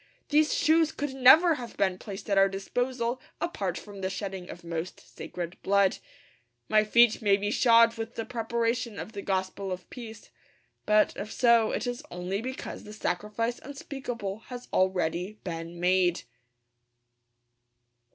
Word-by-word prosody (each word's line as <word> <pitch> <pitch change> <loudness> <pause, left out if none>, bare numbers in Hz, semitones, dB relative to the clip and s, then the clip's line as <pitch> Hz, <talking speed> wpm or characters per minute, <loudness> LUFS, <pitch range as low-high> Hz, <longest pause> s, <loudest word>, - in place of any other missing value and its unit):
These 300 +1 +4
shoes 320 0 +3
could 290 -3 -4
never 310 +7 +7
have 235 - -9
been 190 -2 +1
placed 200 -1 -8
at 200 - +1
our 195 0 +5
disposal 240 +5 -2 0.2
apart 195 - -2
from 200 -2 -10
the 190 - -1
shedding 190 -2 -5
of 175 - -9
most 170 +1 -5
sacred 175 0 -8
blood. 200 -1 +2 0.7
My 215 0 +4
feet 235 +1 +4
may 200 -2 +4
be 205 +1 -2
shod 230 -1 +5
with 225 +1 -5
the 225 - -3
preparation 230 -1 -2
of - - -6
the 200 - -6
gospel 190 0 -2
of 180 -1 -6
peace; 225 -4 -10 0.6
but, 210 0 +4
if 210 +2 -5
so, 235 -3 +4
it - - -2
is 245 +2 -3
only 180 +3 -3
because 260 +2 -6
the 210 - -10
sacrifice 215 +4 -2
unspeakable 250 -7 -6
has 250 -1 -8
already 185 +1 0
been 170 -1 -6
made. 180 -1 +2
210 Hz, 150 wpm, -28 LUFS, 190-240 Hz, 0.7 s, never